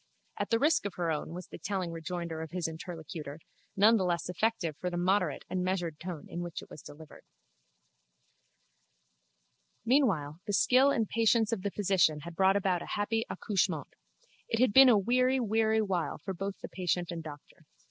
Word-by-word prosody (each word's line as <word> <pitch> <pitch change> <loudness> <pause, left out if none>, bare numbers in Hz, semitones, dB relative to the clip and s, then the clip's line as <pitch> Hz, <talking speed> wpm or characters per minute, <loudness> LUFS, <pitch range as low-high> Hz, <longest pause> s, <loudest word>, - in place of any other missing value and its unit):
At - - -2
the 230 - +3
risk 295 -4 +2
of 195 - -9
her 170 -2 -1
own, 150 -1 -3
was 180 +1 -7
the - - -9
telling 185 0 -3
rejoinder 165 0 -5
of 160 - -6
his 175 0 -2
interlocutor, 160 -3 -7 0.4
none 215 +4 +6
the 190 - 0
less 175 -1 -1
effective 180 -4 -1
for 180 - -3
the 175 - -4
moderate 180 -3 +1
and 185 -1 -2
measured 175 -4 -2
tone 175 -3 -6
in 175 - -5
which 175 -2 -6
it - - -17
was 150 - -10
delivered. 155 0 -13 2.6
Meanwhile 190 - +2
the 205 - -2
skill 255 +8 +5
and 225 -6 +1
patience 225 0 +2
of 225 -5 -1
the 200 - -1
physician 185 -7 +2
had 170 +2 -9
brought 190 +2 +4
about 190 -3 +1
a - - -8
happy 225 +2 -1
accouchement. 205 -4 -1 0.6
It 225 - 0
had 250 -4 +3
been 265 -1 +9
a 230 - +6
weary 255 +5 +2
weary 220 -1 +2
while 185 -5 -2
both 195 +1 -4
for - - -7
patient 180 -1 -2
and 170 -1 -5
doctor. 150 -2 -12
185 Hz, 180 wpm, -30 LUFS, 170-220 Hz, 2.6 s, been